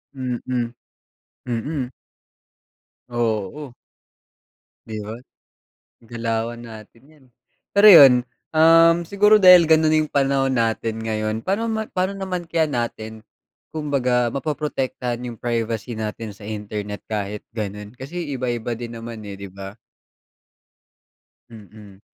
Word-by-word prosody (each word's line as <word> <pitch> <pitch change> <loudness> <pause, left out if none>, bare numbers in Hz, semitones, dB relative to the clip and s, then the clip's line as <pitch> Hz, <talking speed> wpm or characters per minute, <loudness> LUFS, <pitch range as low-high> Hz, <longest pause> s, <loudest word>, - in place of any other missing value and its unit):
Mm, 125 -2 -3 1.1
mm. 125 +2 -3 1.2
Oo. 120 +3 -2 1.1
'Di 110 -1 -5
ba, 110 +2 -6 0.9
galawan 115 0 -3
natin 115 0 -12
'yan, 150 -3 -22
eh. - - -44 0.4
Pero 200 +1 +6
'yun, 140 -8 +10 0.4
um, 165 +1 +6
siguro 210 +3 +5
dahil 180 -2 +9
gano'n 160 0 +4
na 155 - +4
'yung 155 -1 -2
panahon 135 -1 +1
natin 115 -2 0
ngayon, 110 -1 -2
pa'no 200 - -1
ma 220 -1 -1
pa'no 185 +2 -1
naman 185 -3 -4
kaya 165 -1 +1
natin 110 -3 -4 0.5
kumbaga 130 -6 0
mapoprotektahan 135 -5 -3
'yung 120 -2 -7
privacy 115 -1 -3
natin 110 0 -5
sa 100 - -12
internet, 105 -1 -5
kahit 105 -1 -3
gano'n, 105 -1 -5
kasi 160 +3 -6
iba-iba 120 -2 -3
din 120 -1 -7
naman, 115 -1 -8
eh, 100 -1 -7
di 100 -1 -8
ba? 95 +2 -9 1.8
Mm. 105 -2 -14
120 Hz, 115 wpm, -22 LUFS, 110-155 Hz, 1.8 s, yun